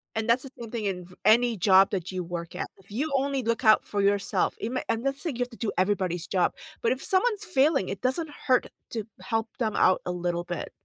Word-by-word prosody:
And 220 Hz, +1 st, -1 dB
that's 235 Hz, +2 st, +4 dB
the 270 Hz, -, -9 dB
same 230 Hz, -2 st, -7 dB
thing 230 Hz, -3 st, -3 dB
in 180 Hz, -2 st, -2 dB
v 185 Hz, -, -16 dB
any 235 Hz, +1 st, +5 dB
job 190 Hz, +1 st, +5 dB
that 185 Hz, -2 st, -3 dB
you 185 Hz, -1 st, -2 dB
work 170 Hz, 0 st, -6 dB
at. -, -, -3 dB
If 195 Hz, +1 st, -23 dB
you 280 Hz, +9 st, -2 dB
only 270 Hz, 0 st, 0 dB
look 230 Hz, +1 st, -1 dB
out 215 Hz, -1 st, +6 dB
for 205 Hz, -1 st, -1 dB
yourself, 200 Hz, 0 st, +1 dB
it 225 Hz, -, -2 dB
may 255 Hz, -, -1 dB
I'm 225 Hz, 0 st, 0 dB
not 275 Hz, +1 st, 0 dB
saying 290 Hz, -3 st, -4 dB
you -, -, -6 dB
have 245 Hz, -, -2 dB
to 230 Hz, -, -12 dB
do 225 Hz, -, -2 dB
everybody's 185 Hz, -3 st, 0 dB
job. 185 Hz, -2 st, +1 dB, 0.3 s
But 235 Hz, -, +3 dB
if 260 Hz, -, -4 dB
someone's 425 Hz, +2 st, +1 dB
failing, 280 Hz, -, +2 dB
it 195 Hz, -, -4 dB
doesn't 295 Hz, +5 st, -1 dB, 0.2 s
hurt 255 Hz, -2 st, +4 dB, 0.2 s
to 225 Hz, -3 st, -3 dB, 0.2 s
help 225 Hz, +3 st, -1 dB
them 220 Hz, -3 st, 0 dB
out 185 Hz, -, +4 dB
a 180 Hz, -, -2 dB
little 175 Hz, -1 st, -2 dB
bit. 175 Hz, -2 st, -5 dB
220 Hz, 250 wpm, -27 LUFS, 185-255 Hz, 0.3 s, out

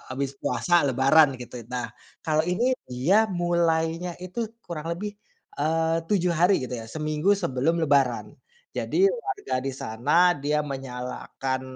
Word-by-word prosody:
habis 140 Hz, 0 st, -2 dB
puasa, 165 Hz, +7 st, +2 dB
Lebaran, 135 Hz, +2 st, +5 dB
gitu. 125 Hz, 0 st, -8 dB
Nah, 125 Hz, -1 st, -2 dB, 0.4 s
kalau 155 Hz, -1 st, +2 dB
ini 230 Hz, +9 st, +1 dB, 0.2 s
dia 160 Hz, -, +3 dB
mulainya 170 Hz, -1 st, 0 dB
itu, 205 Hz, +6 st, -3 dB, 0.2 s
kurang 165 Hz, -2 st, -6 dB
lebih, 205 Hz, +3 st, -4 dB, 0.5 s
eee, 160 Hz, +2 st, +1 dB
7 180 Hz, -4 st, +2 dB
hari, 175 Hz, -2 st, +3 dB
gitu 125 Hz, -1 st, -4 dB
ya, 115 Hz, -, -8 dB
seminggu 155 Hz, -, +1 dB
sebelum 165 Hz, -1 st, 0 dB
Lebaran. 140 Hz, -5 st, +2 dB, 0.5 s
Jadi, 390 Hz, +2 st, +3 dB
warga 410 Hz, -, -3 dB
di 135 Hz, -, -2 dB
sana, 145 Hz, +11 st, +3 dB
dia 150 Hz, +2 st, 0 dB
menyalakan 130 Hz, 0 st, -4 dB
160 Hz, 135 wpm, -25 LUFS, 135-175 Hz, 0.5 s, Lebaran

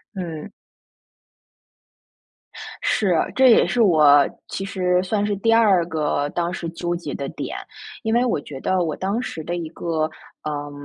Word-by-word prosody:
嗯。 170 Hz, -1 st, -6 dB, 2.3 s
是， 195 Hz, -4 st, +1 dB, 0.2 s
这 265 Hz, 0 st, +6 dB
也 230 Hz, -, +6 dB
是 245 Hz, -, 0 dB
我 150 Hz, -7 st, +6 dB, 0.2 s
其 195 Hz, -, -5 dB
实 180 Hz, -2 st, +1 dB
算 205 Hz, +2 st, 0 dB
是 205 Hz, -1 st, 0 dB
第 225 Hz, +3 st, +2 dB
二 200 Hz, -7 st, +4 dB
个 150 Hz, -3 st, -1 dB
当 175 Hz, +3 st, -2 dB
时 170 Hz, -3 st, -4 dB
纠 175 Hz, +1 st, -3 dB
结 170 Hz, -, -6 dB
的 -, -, -4 dB
点。 -, -, -6 dB, 0.5 s
因 220 Hz, -, 0 dB
为 240 Hz, +1 st, +3 dB
我 235 Hz, -, 0 dB
觉 140 Hz, -2 st, -9 dB
得 185 Hz, +3 st, +1 dB
我 160 Hz, -3 st, -2 dB
当 200 Hz, +5 st, -2 dB
时 160 Hz, -10 st, -6 dB
的 175 Hz, +2 st, -3 dB
一 165 Hz, -2 st, -4 dB
个， 160 Hz, -1 st, -2 dB, 0.3 s
呃， 145 Hz, -1 st, -4 dB
175 Hz, 170 characters per minute, -22 LUFS, 155-200 Hz, 2.3 s, 这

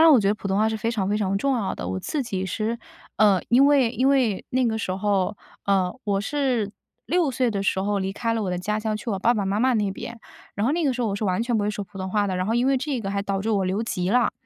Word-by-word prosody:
然 325 Hz, 0 st, +8 dB
我 270 Hz, -, +7 dB
觉 195 Hz, -, +1 dB
得 210 Hz, -, +3 dB
普 205 Hz, -, -7 dB
通 190 Hz, -, +1 dB
话 215 Hz, +1 st, +3 dB
是 220 Hz, -, -2 dB
非 225 Hz, +2 st, -1 dB
常 200 Hz, -5 st, -1 dB
非 210 Hz, +1 st, +1 dB
常 195 Hz, -1 st, 0 dB
重 270 Hz, +5 st, +1 dB
要 200 Hz, -4 st, -1 dB
的， -, -, -6 dB
我 95 Hz, 0 st, -2 dB
自 300 Hz, -, -2 dB
己 190 Hz, -6 st, -3 dB
是 220 Hz, +5 st, -2 dB, 0.4 s
呃， 205 Hz, -4 st, +5 dB
因 260 Hz, +4 st, +6 dB
为 275 Hz, -5 st, +4 dB
因 255 Hz, +2 st, +1 dB
为 250 Hz, -8 st, +2 dB
那 255 Hz, 0 st, +2 dB
个 220 Hz, -1 st, 0 dB
时 185 Hz, -, -2 dB
候， 195 Hz, 0 st, 0 dB, 0.3 s
呃， 190 Hz, -2 st, +2 dB
我 200 Hz, -1 st, +1 dB
是 250 Hz, -4 st, 0 dB, 0.4 s
6 345 Hz, -5 st, +2 dB
岁 250 Hz, -1 st, +1 dB
的 200 Hz, -2 st, -2 dB
时 190 Hz, -, +1 dB
候 205 Hz, 0 st, 0 dB
离 190 Hz, 0 st, -2 dB
开 230 Hz, +2 st, -1 dB
了 225 Hz, -1 st, -1 dB
我 190 Hz, -, -2 dB
的 180 Hz, -, -1 dB
家 210 Hz, +4 st, -1 dB
乡 215 Hz, 0 st, -1 dB
去 225 Hz, +2 st, -5 dB
我 195 Hz, -, -1 dB
爸 235 Hz, +5 st, +3 dB
爸 205 Hz, -, -1 dB
妈 195 Hz, +2 st, 0 dB
妈 260 Hz, +1 st, +3 dB
那 210 Hz, -3 st, +1 dB
边。 230 Hz, +4 st, -7 dB, 0.4 s
然 205 Hz, -, -1 dB
后 270 Hz, -, +2 dB
那 335 Hz, 0 st, 0 dB
个 270 Hz, -, +2 dB
时 250 Hz, -, -2 dB
候 230 Hz, -, +1 dB
我 200 Hz, -, -2 dB
是 215 Hz, -, -3 dB
完 185 Hz, +2 st, +1 dB
全 235 Hz, -1 st, 0 dB
不 205 Hz, -, +1 dB
会 210 Hz, -, +1 dB
说 205 Hz, -1 st, -4 dB
普 190 Hz, +1 st, -12 dB
通 190 Hz, -, -3 dB
话 205 Hz, +1 st, +1 dB
的， 185 Hz, -, -1 dB
然 185 Hz, +1 st, -1 dB
后 225 Hz, -, 0 dB
因 240 Hz, +2 st, +2 dB
为 270 Hz, 0 st, +3 dB
这 270 Hz, -1 st, -2 dB
个 195 Hz, -2 st, -3 dB
还 200 Hz, 0 st, -1 dB
导 195 Hz, -1 st, -2 dB
致 220 Hz, -, -1 dB
我 200 Hz, -3 st, +1 dB
留 190 Hz, +4 st, 0 dB
级 180 Hz, -5 st, -2 dB
了， 245 Hz, +4 st, +3 dB
215 Hz, 330 characters per minute, -24 LUFS, 195-240 Hz, 0.4 s, 然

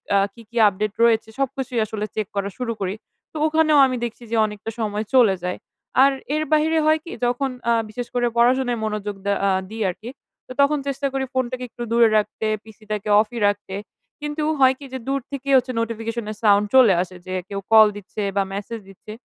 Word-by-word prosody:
আ -, -, +6 dB, 0.2 s
কী, 235 Hz, -, -14 dB
কী 235 Hz, -, -8 dB
update 205 Hz, +2 st, -3 dB
রয়েছে? 225 Hz, -2 st, +3 dB
সবকিছুই 265 Hz, -2 st, -2 dB
আসলে 210 Hz, 0 st, -4 dB
check 215 Hz, -2 st, -2 dB
করা 200 Hz, 0 st, -1 dB
শুরু 245 Hz, -2 st, -2 dB
করি। 190 Hz, +1 st, -2 dB, 0.4 s
তো -, -, -33 dB
ওখানেও 310 Hz, -1 st, +3 dB
আমি 255 Hz, -1 st, -1 dB
দেখছি 235 Hz, +1 st, -8 dB
যে, -, -, +1 dB
অনেকটা 210 Hz, +1 st, -6 dB
সময় 215 Hz, -1 st, -2 dB
চলে 230 Hz, -7 st, +6 dB
যায়। 180 Hz, 0 st, -2 dB, 0.5 s
আর 275 Hz, -, +5 dB, 0.2 s
এর 310 Hz, -, 0 dB
বাহিরে 315 Hz, +1 st, +3 dB
হয় 310 Hz, +1 st, +4 dB
কী, 340 Hz, -, -9 dB
যখন 245 Hz, +3 st, 0 dB, 0.2 s
আ -, -, +5 dB, 0.2 s
বিশেষ 245 Hz, +2 st, -5 dB
করে 245 Hz, 0 st, +2 dB
পড়াশোনায় 245 Hz, 0 st, +3 dB
মনোযোগ 210 Hz, -1 st, -3 dB
দে 200 Hz, -, +2 dB
আ -, -, +3 dB, 0.2 s
দিই 220 Hz, +1 st, -6 dB
আরকি, 215 Hz, +6 st, -7 dB, 0.4 s
তো -, -, -11 dB
তখন 290 Hz, +2 st, +3 dB
চেষ্টা 275 Hz, 0 st, -1 dB
করি 270 Hz, 0 st, -1 dB
ফোনটাকে 255 Hz, -1 st, -2 dB
একটু 240 Hz, -, -7 dB
দূরে 235 Hz, 0 st, +5 dB
রাখতে, 215 Hz, +1 st, -2 dB, 0.2 s
PC 220 Hz, -2 st, -16 dB
টাকে 210 Hz, 0 st, -3 dB
off 215 Hz, -, +1 dB
ই -, -, -2 dB
রাখতে। 205 Hz, -1 st, -2 dB, 0.5 s
কিন্তু 295 Hz, +1 st, -3 dB, 0.2 s
হয় 260 Hz, -1 st, +6 dB
কী 285 Hz, -, -10 dB
যে, -, -, -2 dB
দূর 275 Hz, 0 st, 0 dB
থেকেই 275 Hz, 0 st, -2 dB
হচ্ছে 255 Hz, 0 st, 0 dB
notification 230 Hz, 0 st, -3 dB
এর 215 Hz, -, -8 dB
sound 205 Hz, -1 st, +5 dB
চলে 245 Hz, -7 st, +7 dB
আসে 185 Hz, 0 st, -6 dB
যে, 185 Hz, -, -5 dB, 0.2 s
কেউ 200 Hz, -1 st, -3 dB
call 220 Hz, -1 st, +9 dB
দিচ্ছে 205 Hz, +1 st, -7 dB, 0.2 s
বা 200 Hz, -, +4 dB
message 205 Hz, +2 st, -6 dB
দিচ্ছে। 195 Hz, +2 st, -12 dB
230 Hz, 210 wpm, -22 LUFS, 210-265 Hz, 0.5 s, call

